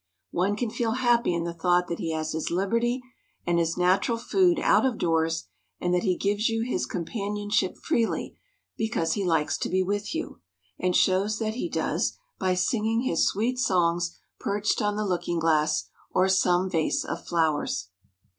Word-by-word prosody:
One 190 +4 +1
can 220 +1 -2
feel 225 -1 -1
happy 240 -4 +2
in 170 -1 -1
the 170 0 -3
thought 175 +1 +2
that 170 - -4
he 165 - -2
has 155 0 -2
his 160 0 -2
liberty 230 +8 0 0.4
and 170 0 +2
his 165 -1 0
natural 185 +6 +2
food 355 +7 +2
out - - +4
of 260 -4 +1
doors, 165 -1 0 0.3
and 175 0 0
that 180 - +2
he 185 -4 +1
gives 205 +3 +1
you 225 0 0
his 250 - -1
companionship 205 +1 -2
freely 230 -1 -1 0.4
because 220 -7 0
he 200 - -1
likes 165 -4 +1
to - - -2
be 185 +1 +2
with 205 - -2
you, 325 - -5 0.4
and 180 -1 +1
shows 200 +3 +3
that 220 -1 -2
he 255 +9 -3
does, - - -1 0.2
by 185 -1 +1
singing 220 +4 +1
his 170 -10 +2
sweet 240 +5 0
songs 170 -6 +1 0.2
perched 205 +3 0
on 210 -1 0
the 210 0 -1
looking 175 -2 -1
glass 160 -2 +1 0.2
or 185 +1 +2
some 185 -1 +3
vase 165 -4 0
of - - -5
flowers. 155 - 0
190 Hz, 175 wpm, -26 LUFS, 170-220 Hz, 0.4 s, out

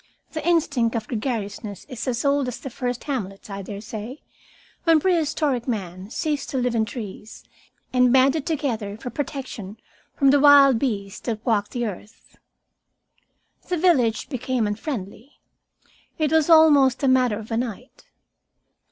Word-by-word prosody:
The 315 - -5
instinct 285 -9 +2
of 225 -2 -3
gregariousness 210 -4 -4
is 255 -2 -6
as 250 +1 -1
old 280 -1 +2
as 250 - -5
the 270 - -7
first 245 0 -3
hamlets, 205 -8 -5
I 195 0 -5
daresay, 215 +4 -7 0.7
when 330 -2 +5
prehistoric 300 -7 0
man 190 -4 -4
ceased 295 +2 -2
to 270 - -3
live 250 -1 0
in 225 -1 +1
trees, 215 -1 -8 0.5
and 250 -1 +4
banded 270 +3 +3
together 235 -10 -2
for 245 +2 -7
protection 255 -8 -6 0.4
from 275 -2 +4
the 285 - +4
wild 280 -4 +7
beasts 200 -7 -3
that 220 -2 -3
walked 210 -4 +1
the 240 -2 -3
earth. 210 +1 -9 1.3
The 360 - 0
village 270 -12 +2
became 255 -3 -1
unfriendly. 215 +2 -5 0.8
It 310 -2 0
was 320 0 +3
almost 295 -6 +6
a - - +3
matter 255 -4 +3
of 220 +1 -9
a 225 - 0
night. 245 +1 -6
250 Hz, 145 wpm, -23 LUFS, 215-280 Hz, 1.3 s, wild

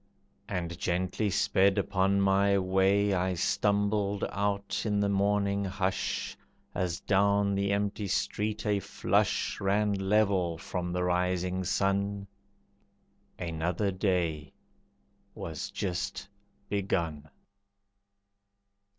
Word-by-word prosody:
And 85 -3 -3
gently 95 +4 0
sped 95 +1 +3
upon 100 0 +2
my 100 0 +3
way 95 +2 +2
I 90 0 0
stumbled 100 +2 +1
out 100 0 -1
in 105 -2 0
the 100 0 +1
morning 100 0 +1
hush, 95 -1 -2 0.4
As 90 -2 -2
down 100 0 +2
the 100 0 0
empty 100 0 -1
street 105 +4 -1
a 105 -1 +2
flush - - 0
Ran 105 +1 +2
level 95 -3 +1
from 90 +1 -4
the 90 0 -1
rising 90 +1 0
sun. 100 +2 0 1.1
Another 85 +4 -1
day 90 -5 -1 0.8
was 80 +3 -5
just 100 0 -3 0.4
begun. 85 -7 -2
100 Hz, 100 wpm, -29 LUFS, 90-100 Hz, 1.1 s, sped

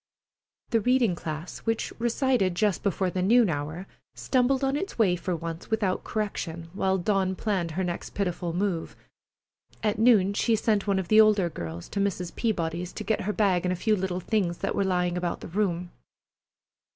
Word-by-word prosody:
The 230 -2 +3
reading 245 -3 +3
class 160 0 -6
which 225 -1 -2
recited 235 -5 +1
just 205 0 +1
before 190 -2 0
the 185 - -1
noon 220 +1 +4
hour 155 +5 -4 0.3
stumbled 265 +1 +1
on 270 +1 +1
its 385 +7 -4
way 200 -6 +4
for 180 +1 -2
once 165 0 -6
without 210 -5 0
correction, 170 -6 -4
while 190 -1 +1
Dawn 190 0 +1
planned 190 -5 -1
her 190 - +1
next 175 -1 -4
pitiful 180 -3 -1
move. 180 -1 -2 0.9
At 210 -1 0
noon 215 -4 +5
she 225 +2 +2
sent 215 -2 +1
one 200 -1 +2
of 190 -2 -2
the 220 0 +8
older 205 -5 +3
girls 85 - -6
to 200 - -3
Mrs. 180 -3 -2
Peabody's, 175 -5 -1
to - - -5
get 220 - 0
her 210 +2 -2
bag 195 -5 +2
and 180 - 0
a - - 0
few 215 +4 +1
little 185 -2 -2
things 180 -4 0
that - - -2
were - - +1
lying 180 -2 0
about 175 -1 -2
the - - -7
room. 180 -2 -1
190 Hz, 185 wpm, -27 LUFS, 175-215 Hz, 0.9 s, the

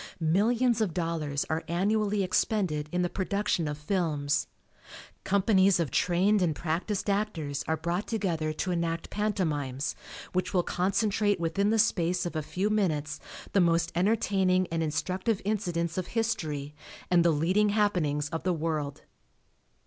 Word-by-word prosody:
Millions 225 +8 +2
of 190 -7 -1
dollars 160 -5 -1
are 160 +1 -1
annually 205 +3 +1
expended 180 -5 0
in 180 0 0
the - - +2
production 195 -2 -1
of 150 0 -3
films. 150 -3 0 0.8
Companies 195 -1 +3
of 165 -4 -1
trained 190 +4 +2
and 165 -4 +1
practiced 175 +7 -2
actors 190 -9 -1
are 160 - +1
brought 170 +5 -2
together 170 -8 -1
to 180 +4 -2
enact 170 -1 -2
pantomimes 155 -10 -1 0.4
which 185 +1 -1
will 175 - +3
concentrate 200 +2 +1
within 170 +5 +1
the 225 - +2
space 180 -4 +2
of 175 - -4
a 155 - 0
few 190 +7 -2
minutes 155 -9 0 0.3
the 195 - +4
most 170 -1 +2
entertaining 185 -1 +2
and 165 0 0
instructive 185 +7 -1
incidents 175 -5 -1
of 185 - -4
history 155 -11 -2 0.4
and 175 -1 +5
the 170 - +4
leading 180 +7 +2
happenings 180 -9 +1
of 165 0 -3
the 185 0 0
world. 155 -3 -3
180 Hz, 145 wpm, -28 LUFS, 160-200 Hz, 0.8 s, and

